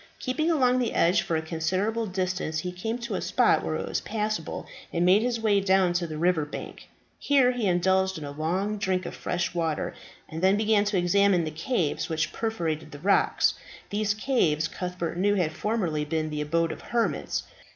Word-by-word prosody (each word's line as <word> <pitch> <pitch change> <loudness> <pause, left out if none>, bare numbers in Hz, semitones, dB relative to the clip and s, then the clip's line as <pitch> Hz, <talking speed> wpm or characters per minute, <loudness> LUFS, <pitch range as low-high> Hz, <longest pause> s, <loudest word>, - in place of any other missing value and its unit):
Keeping 295 +5 -1
along 255 -6 +3
the 240 -3 -1
edge 175 +4 +4
for 165 - -2
a 160 - -1
considerable 185 +8 -1
distance, 185 -4 -2
he 180 - -4
came 220 +6 -3
to 235 -1 -5
a - - -1
spot - - +3
where - - -2
it - - -3
was - - -2
passable, 215 -6 -3 0.3
and 170 +1 +1
made 190 +4 +5
his 240 0 -1
way 210 -3 +3
down 190 -2 +3
to 175 -1 -1
the 155 -1 -6
river 170 -1 +2
bank. 150 - -8 0.3
Here 270 -3 +4
he 245 -4 -1
indulged 190 +1 +2
in 155 - -7
a 145 - -5
long 185 +8 -2
drink 185 -1 0
of - - -5
fresh 175 0 -2
water, 165 -3 -1 0.3
and 160 +1 -6
then 190 +2 +4
began 215 -1 +3
to 205 -1 0
examine 185 0 +3
the 155 - -3
caves 160 - -1
which 160 -1 -1
perforated 165 -9 -2
the 145 - -8
rocks. 195 +7 +3 0.4
These 205 0 0
caves 180 - +1
Cuthbert 180 -2 -4
knew 205 +2 +3
had 170 -5 0
formerly 175 -5 -1
been 155 +1 -2
the 150 0 -2
abode 165 +2 0
of - - -8
hermits. 235 -1 -1
185 Hz, 195 wpm, -27 LUFS, 165-215 Hz, 0.4 s, made